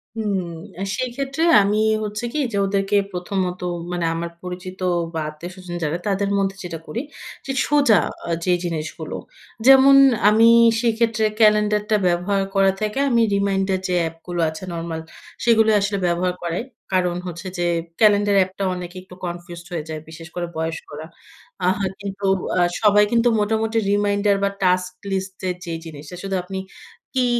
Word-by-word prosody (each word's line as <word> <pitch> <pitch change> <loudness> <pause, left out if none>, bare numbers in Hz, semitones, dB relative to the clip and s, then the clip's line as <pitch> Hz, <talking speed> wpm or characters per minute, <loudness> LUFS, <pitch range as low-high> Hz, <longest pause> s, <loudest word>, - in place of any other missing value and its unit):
হু, 225 - -3 0.5
অ্যা 185 - -5
সেইক্ষেত্রে 270 +5 -2 0.2
আমি 200 +1 +1 0.3
হচ্ছে 210 +2 -4
কি? 305 - -1
যে 200 - -2
ওদেরকে 195 +1 0 0.2
প্রথমত 180 0 -2 0.3
মানে 175 -1 -1
আমার 170 +1 -3
পরিচিত 180 +1 -7 0.3
বা 165 - -2
আত্মীয়স্বজন 175 +3 -8
যারা 155 +2 0
তাদের 200 0 0
মধ্যে 195 -1 0
যেটা 165 -2 -6
করি 235 - -3 0.4
যে 275 - -3 0.2
সোজা 280 -10 +5 0.3
আ - - -4 0.2
যে 180 - +3
জিনিসগুলো 160 -2 -4 0.5
যেমন 270 +1 +8 0.3
আমি 220 +2 +5 0.3
সেক্ষেত্রে 230 -1 +1
ক্যালেন্ডারটা 210 0 +3
ব্যবহার 180 +3 +1
করা 195 0 +5
থেকে 215 +5 -1
আমি 235 -2 +3
reminder 195 -1 +1
যে 180 - -1 0.2
এপগুলো 170 +2 -5
আছে 160 +3 -9
নরমাল 165 -1 -4 0.4
সেগুলো 225 -2 +5
আসলে 200 0 0
ব্যবহার 175 +1 0
করাই। 170 +5 -2 0.3
কারণ 180 -2 +2
হচ্ছে 175 +1 -6
যে 175 - 0 0.3
ক্যালেন্ডার 205 -1 +4
অ্যাাপটা 190 +1 0
অনেকে 180 0 -7
একটু 185 -1 -14
confused 175 0 -7
হয়ে 165 -3 -3
যায়। 155 -1 -4
বিশেষ 160 0 -10
করে 175 -1 -2
বয়স্করা। 160 -1 -5 0.6
আহ 185 +1 +2 0.2
কিন্তু 200 0 -5 0.3
আ - - +3 0.2
সবাই 210 -1 +6
কিন্তু 235 0 +3
মোটামুটি 220 +2 0
reminder 205 0 +2
বা 200 - +3
task 180 0 +2 0.2
list 190 0 -3
এর 180 - -1
যে 170 - -4
জিনিসটা 155 +1 -9
শুধু 195 -1 -2
আপনি 190 +1 -5 0.6
কি 255 -1 +3
190 Hz, 155 wpm, -21 LUFS, 175-210 Hz, 0.6 s, যেমন